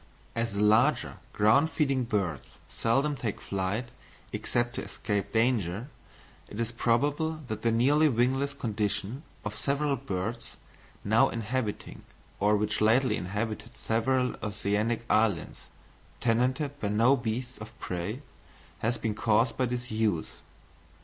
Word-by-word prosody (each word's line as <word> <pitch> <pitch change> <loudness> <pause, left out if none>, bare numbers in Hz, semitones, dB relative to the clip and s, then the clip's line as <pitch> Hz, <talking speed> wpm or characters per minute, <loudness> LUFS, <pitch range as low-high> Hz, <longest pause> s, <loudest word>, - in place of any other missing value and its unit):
As 115 -1 -1
the 100 +1 +1
larger 115 +8 +3
ground 125 +9 +4
feeding 140 -4 +1
birds 95 - -2
seldom 135 +6 +1
take 115 -6 -3
flight 100 +5 -2 0.4
except 120 0 -1
to - - -3
escape 100 -2 -3
danger, 115 - +1 0.6
it 105 - -8
is 115 0 -1
probable 145 +7 +1
that 110 0 -3
the 115 - +2
nearly 145 +7 +4
wingless 130 +3 +1
condition 110 -1 -2 0.2
of 105 0 -3
several 140 +3 0
birds, 115 -2 -4 0.5
now 110 +3 +4
inhabiting 115 -1 -3 0.4
or 105 +1 +4
which 105 +1 -1
lately 120 +5 +4
inhabited 110 +5 -4
several 125 +3 +1
oceanic 105 +2 -1
islands, 105 -6 +1 0.5
tenanted 130 +5 +1
by 105 - -1
no 115 +6 +4
beasts 120 +1 -3
of 110 - -10
prey, 90 - -4 0.6
has 115 +2 0
been 110 -2 -1
caused 115 +2 +2
by 130 - +1
disuse. 110 -7 -1
115 Hz, 125 wpm, -29 LUFS, 105-130 Hz, 0.6 s, ground